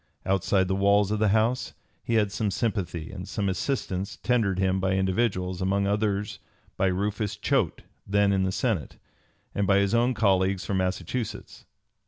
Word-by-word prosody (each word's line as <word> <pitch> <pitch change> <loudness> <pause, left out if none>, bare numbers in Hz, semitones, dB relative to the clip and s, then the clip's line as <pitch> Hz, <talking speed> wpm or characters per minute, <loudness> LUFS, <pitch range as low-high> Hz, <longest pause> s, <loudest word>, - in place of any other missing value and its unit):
Outside 95 0 +2
the 95 - 0
walls 100 +1 +3
of 105 - 0
the 110 - +3
House 110 +5 +1 0.3
he 115 - -1
had 105 -3 +2
some 105 +1 -1
sympathy 95 -7 -2
and 95 0 -7
some 100 +1 -2
assistance 95 -2 -2
tendered 110 -7 +1
him 95 0 +1
by 95 0 0
individuals, 95 -1 0
among 100 +1 +1
others 105 0 -1 0.4
by 95 - +1
Rufus 105 +2 -1
Choate - - 0 0.2
then 100 0 +3
in 95 - +2
the 95 0 0
Senate, 95 - -2 0.6
and 100 -1 0
by 100 0 +4
his 100 +1 +2
own 120 +2 +2
colleagues 95 -3 +2
from 100 - -1
Massachusetts. 95 +5 -3
100 Hz, 165 wpm, -26 LUFS, 95-105 Hz, 0.6 s, by